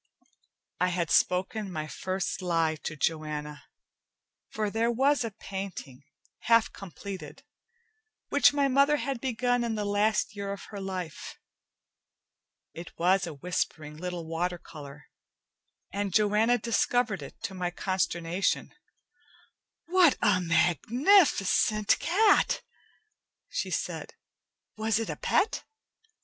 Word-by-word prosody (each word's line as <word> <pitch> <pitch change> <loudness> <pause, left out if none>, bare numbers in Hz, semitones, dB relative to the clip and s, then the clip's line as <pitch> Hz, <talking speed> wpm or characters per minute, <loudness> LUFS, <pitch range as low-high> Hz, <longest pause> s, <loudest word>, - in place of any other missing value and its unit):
I 180 - +3
had 175 -2 -1
spoken 190 +2 +1
my 155 -3 -3
first 185 +5 -3
lie 165 -3 +1
to 155 - -3
Joanna, 150 -1 -3 0.8
for 215 -1 -2
there 225 +2 +1
was 270 +3 +2
a 230 - -2
painting, 195 - -7 0.4
half 230 -1 +3
completed, 195 0 -9 0.9
which 285 - +5
my 285 -1 +2
mother 280 +2 +4
had 275 -4 -3
begun 245 -1 0
in 230 -1 -1
the 210 -1 -2
last 205 +1 +1
year 200 -1 -4
of 200 - -9
her 205 - -6
life. 185 -4 -6 1.4
It 170 +1 -10
was 185 +2 +2
a 160 - -7
whispering 155 -1 -3
little 175 +1 -5
watercolor, 160 -4 -5 0.9
and 200 0 -2
Joanna 215 +4 +3
discovered 230 -3 0
it 140 - -10
to 195 - -3
my 180 -1 -2
consternation. 175 -1 -1 1.1
"What 355 -4 +4
a 205 -4 +3
magnificent 215 - +3
cat!" 405 +4 +3 0.9
she - - -3
said. - - -4 0.6
"Was 220 0 +1
it 225 - -2
a - - -4
pet?" 430 - 0
195 Hz, 115 wpm, -28 LUFS, 170-230 Hz, 1.4 s, which